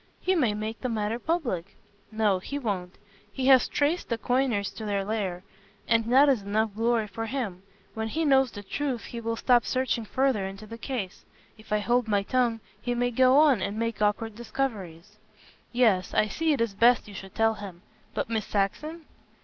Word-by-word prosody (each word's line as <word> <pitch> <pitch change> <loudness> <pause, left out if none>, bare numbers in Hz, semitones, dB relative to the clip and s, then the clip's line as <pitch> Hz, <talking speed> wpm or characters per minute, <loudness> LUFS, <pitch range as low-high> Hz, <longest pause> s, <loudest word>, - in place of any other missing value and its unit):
He 375 - +1
may 250 - +2
make 215 +1 -5
the 255 - -2
matter 220 0 -1
public." 240 - -2 0.4
"No, 215 -3 +2
he 280 +9 -5
won't. 195 -8 -3 0.3
He 255 +5 -3
has 260 -2 +6
traced 300 +5 0
the 230 - 0
coiners 235 -5 0
to 200 +3 -8
their 200 -2 -1
lair, 195 -4 -2 0.4
and 230 -1 +3
that 275 +3 +7
is 265 -6 +3
enough 210 +2 0
glory 225 +1 +1
for 225 +2 -5
him. 220 -8 -3 0.3
When 220 0 -3
he 315 +8 -1
knows 265 -2 +4
the 205 -3 -9
truth 260 +3 -3
he 235 - -7
will 230 0 -2
stop 240 0 +3
searching 255 -3 -1
further 260 -3 +1
into 195 +2 -9
the 230 +2 -9
case. 225 -8 -5 0.3
If 215 -1 -18
I 210 - +3
hold 240 +3 +1
my 205 -2 +1
tongue, 240 -1 +1 0.2
he 245 0 -2
may 245 0 0
go 255 +2 +5
on, 290 -8 +5
and 200 +3 -2
make 230 -1 -2
awkward 210 +2 +1
discoveries." 210 -6 -4 0.5
"Yes, 220 -7 +2
I 215 - +3
see 320 +9 0
it 280 - +1
is 230 -3 0
best 235 +4 +4
you 205 - -10
should 195 -1 -9
tell 225 0 +3
him. 195 -5 -9 0.3
But - - -1
Miss 220 -2 -2
Saxon?" 305 - -2
225 Hz, 195 wpm, -27 LUFS, 205-255 Hz, 0.5 s, that